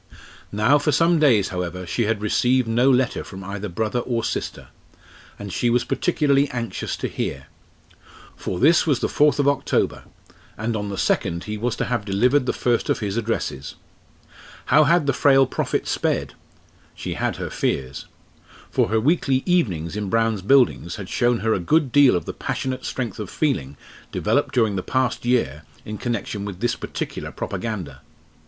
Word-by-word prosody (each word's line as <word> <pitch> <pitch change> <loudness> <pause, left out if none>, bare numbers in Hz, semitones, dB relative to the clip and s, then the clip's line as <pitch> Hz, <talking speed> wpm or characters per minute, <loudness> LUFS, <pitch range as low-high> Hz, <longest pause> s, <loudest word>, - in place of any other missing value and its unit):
Now 110 +8 +3
for 150 +1 +1
some 165 +3 +3
days, 115 -10 +4
however, 90 0 -4
she 115 +6 -1
had 105 -1 -1
received 125 +3 +2
no 120 +4 +3
letter 130 -1 +2
from 95 0 -9
either 100 +2 -5
brother 110 +7 -1
or 120 -1 -2
sister, - - -4 0.7
and 100 -3 -7
she 120 - +1
was 120 +1 +2
particularly 145 -5 +1
anxious 120 -4 -4
to - - -3
hear. 65 0 -4 0.9
For 90 - -4
this 165 +4 +4
was 145 -5 +2
the - - 0
fourth 150 0 +3
of 140 -1 +2
October, 140 -1 0 0.5
and 110 +1 -2
on 105 -1 -3
the 100 - -5
second 85 0 0
he 105 - -4
was 115 +2 -2
to - - -2
have 120 -4 -1
delivered 125 +7 +2
the - - +3
first 120 -2 0
of - - +2
his 100 -2 -3
addresses. 115 - -3 0.9
How 150 +3 +5
had 170 +1 +3
the 140 - +2
frail 135 0 +5
prophet 130 - -2
sped? - - -1 0.6
She - - -5
had - - -1
her - - -5
fears. 65 0 -2 0.6
For - - +2
her 110 +1 +2
weekly 135 0 +1
"evenings" 100 - 0
in 105 -2 -3
Brown's 115 -2 +1
Buildings 120 -6 +3
had 100 -4 -8
shown 120 -1 +1
her 110 0 +2
a - - 0
good 145 - +2
deal 140 -5 +6
of 90 - -2
the - - -5
passionate 130 -1 -3
strength 120 -3 -4
of 105 - -5
feeling 75 - -1 0.3
developed - - 0
during 110 -5 +2
the - - -1
past 130 +3 -1
year 115 - +1 0.2
in 105 0 -6
connection 115 -4 -3
with 100 -3 -6
this 120 +3 0
particular - - -5
propaganda. 90 - -5
115 Hz, 175 wpm, -22 LUFS, 100-135 Hz, 0.9 s, deal